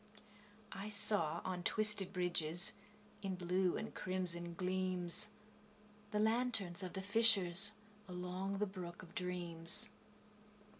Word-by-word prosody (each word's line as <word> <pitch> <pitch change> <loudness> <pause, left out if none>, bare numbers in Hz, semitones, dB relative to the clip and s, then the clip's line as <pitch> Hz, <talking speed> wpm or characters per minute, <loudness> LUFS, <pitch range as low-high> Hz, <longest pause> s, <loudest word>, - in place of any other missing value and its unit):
I 195 +2 -7
saw, 200 -6 +4
on 180 -1 -4
twisted 210 0 +2
bridges, 175 0 +1 0.5
In 195 -2 -3
blue 180 0 0
and 220 - -6
crimson 175 -2 -1
gleams, 185 +1 0 0.8
The 210 - -3
lanterns 220 -4 0
of 185 -1 -6
the 190 - -5
fishers, 200 -2 +4 0.3
Along 180 +2 -5
the 210 - 0
brook 180 -3 -9
of 175 0 -15
dreams. 180 +3 0
185 Hz, 110 wpm, -37 LUFS, 175-205 Hz, 0.8 s, saw